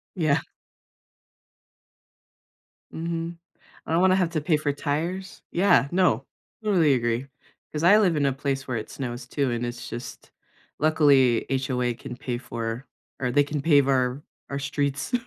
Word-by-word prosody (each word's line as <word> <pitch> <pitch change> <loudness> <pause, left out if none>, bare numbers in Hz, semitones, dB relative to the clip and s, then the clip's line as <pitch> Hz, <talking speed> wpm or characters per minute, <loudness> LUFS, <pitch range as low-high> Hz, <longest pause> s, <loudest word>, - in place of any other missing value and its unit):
Yeah. 155 -6 +2 2.5
Mhm. 165 +1 -4 0.5
I - - -3
don't 165 - +3
wanna 185 0 +5
have 180 -3 +1
to 165 -2 -1
pay 155 +1 +2
for 150 -1 -1
tires. 170 +8 -3
Yeah, 175 -6 +4
no, 175 -9 +2 0.4
totally 175 -9 +3
agree. 120 +1 -1 0.5
'Cause 150 - -3
I 190 +5 +7
live 185 -6 +3
in 145 -1 +2
a 135 - +2
place 135 0 -3
where 125 - -1
it 110 - -5
snows 120 -2 -5
too, 140 0 -1
and 120 0 -2
it's 120 0 -5
just 120 - -8 0.5
luckily, 140 -6 +4
HOA 130 -2 0
can 120 +1 -8
pay 120 -1 -4
for 115 0 -5 0.3
or 125 -2 0
they 145 +3 +4
can 145 0 -3
pave 145 -4 +5
our 130 0 +1 0.3
our 140 - -2
streets 140 0 -2
140 Hz, 155 wpm, -25 LUFS, 125-165 Hz, 2.5 s, I